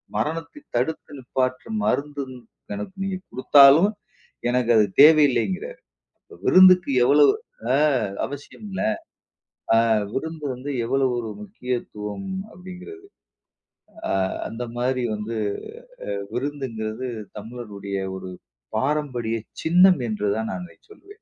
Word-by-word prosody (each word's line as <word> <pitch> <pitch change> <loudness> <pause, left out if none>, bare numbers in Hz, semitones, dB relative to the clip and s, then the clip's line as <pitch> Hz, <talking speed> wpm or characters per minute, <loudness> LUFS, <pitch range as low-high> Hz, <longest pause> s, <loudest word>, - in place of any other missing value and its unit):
மரணத்தை 165 - -3 0.2
தடுத்து 160 -2 -1
நிப்பாட்ற 130 0 -2 0.2
மருந்து 145 0 -1 0.5
எனக்கு 105 - -6
நீங்க 195 -1 -2
குடுத்தாலும், 140 +7 +6 0.6
எனக்கு 120 -1 +2
அது 110 -2 +6 0.2
தேவையில்லைங்கிறாரு. 135 - +4 0.4
அப்ப - - -16
விருந்துக்கு 185 -4 +7
எவ்ளோ 145 +3 +6 0.5
அ - - +5 0.5
அவசியமில்ல. 185 +8 -8 1.0
அ - - +6 0.3
விருந்து 160 +2 -4
வந்து 135 +3 -6
எவ்வளோ 135 +2 +1
ஒரு 115 -2 -4
முக்கியத்துவம் 125 - -5 0.2
அப்படிங்கிறது. 185 - -11 1.0
அ - - 0 0.4
அந்த 115 +2 -5
மாரி 125 0 0
வந்து 110 +2 -4 0.8
அ 100 - -3
விருந்துங்கிறது 125 -3 -4 0.3
தமிழருடைய 105 -3 -6 0.2
ஒரு 95 -1 -7 0.5
பாரம்பரிய 130 -5 -1 0.3
சின்னம் 180 0 +5
என்று 105 -1 -2
தான் 110 0 -2
நான் 180 - -5
இதை - - -20
சொல்வேன். 410 -1 -15
135 Hz, 105 wpm, -23 LUFS, 115-160 Hz, 1.0 s, விருந்துக்கு